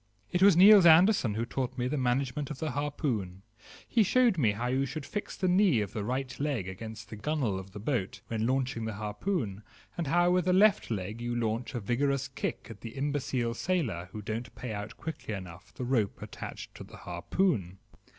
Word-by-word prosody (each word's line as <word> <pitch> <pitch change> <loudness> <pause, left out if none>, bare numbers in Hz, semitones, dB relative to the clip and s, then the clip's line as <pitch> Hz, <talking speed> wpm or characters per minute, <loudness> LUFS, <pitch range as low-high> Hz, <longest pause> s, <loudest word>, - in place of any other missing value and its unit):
It 180 - 0
was 195 -3 +7
Niels 195 -1 +9
Andersen 165 - +5
who 115 +2 -1
taught 130 +1 -3
me 125 0 0
the 135 - -1
management 130 +1 0
of 150 - -5
the 155 0 -2
harpoon; 125 - -2 0.4
he 235 - +3
showed 240 +1 +4
me 115 -10 +2
how 115 +4 -3
you 130 +2 +1
should 155 +1 -6
fix 205 - -5
the 185 - 0
knee 180 - +4
of 105 +1 -3
the 110 -3 -3
right 130 +4 -3
leg 140 -10 -1
against 110 +4 -8
the - - -5
gun 150 +8 -2
whale 100 -7 0
of 95 0 -10
the 105 - -9
boat 110 -4 -2
when 110 0 -1
launching 130 -3 -1
the 110 -2 -4
harpoon, 105 - -3 0.3
and 170 -3 -3
how 175 +4 +3
with 180 -1 +2
the 180 - +3
left 205 +2 +4
leg 105 +1 -4
you 120 0 -2
launch 115 +2 -2
a - - -1
vigorous 135 +5 0
kick - - -4
at 105 - -11
the 115 - -8
imbecile 135 -4 -1
sailor 115 - -1
who 105 +1 -7
don't 110 +4 -5
pay 125 -3 -5
out 105 +2 -6
quickly 150 -9 -5
enough 95 -1 -10
the 125 - -4
rope 120 -6 0
attached - - -8
to - - -9
the - - -13
harpoon. 95 - -1
125 Hz, 210 wpm, -30 LUFS, 110-155 Hz, 0.4 s, Niels